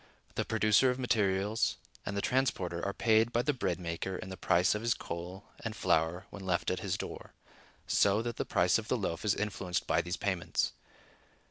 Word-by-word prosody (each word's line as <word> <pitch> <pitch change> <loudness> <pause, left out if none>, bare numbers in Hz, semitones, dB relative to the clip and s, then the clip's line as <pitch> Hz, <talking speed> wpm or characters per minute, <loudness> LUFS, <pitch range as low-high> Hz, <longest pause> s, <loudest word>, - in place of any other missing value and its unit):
The - - -1
producer 110 +3 +4
of 125 - 0
materials 105 -4 +1 0.3
and 100 - -2
the 100 - -1
transporter 95 -10 0
are 100 - 0
paid 110 +2 +3
by 120 0 +1
the 150 - +1
bread 90 - -1
maker 85 +2 -3
in 95 - -6
the 95 - -5
price 90 0 +3
of 105 - -3
his 115 0 +1
coal 90 +3 -6 0.2
and - - -3
flour 80 +4 +1
when 100 - -8
left 90 -2 0
at 90 - -1
his 95 -1 -2
door, - - -7 0.5
so 100 +2 +3
that 120 -1 -4
the - - 0
price - - +3
of - - -8
the - - +1
loaf 85 - -3
is 105 -3 +2
influenced 95 -4 -2
by - - +2
these 90 +1 -3
payments. 95 -4 0
100 Hz, 200 wpm, -32 LUFS, 90-110 Hz, 0.5 s, producer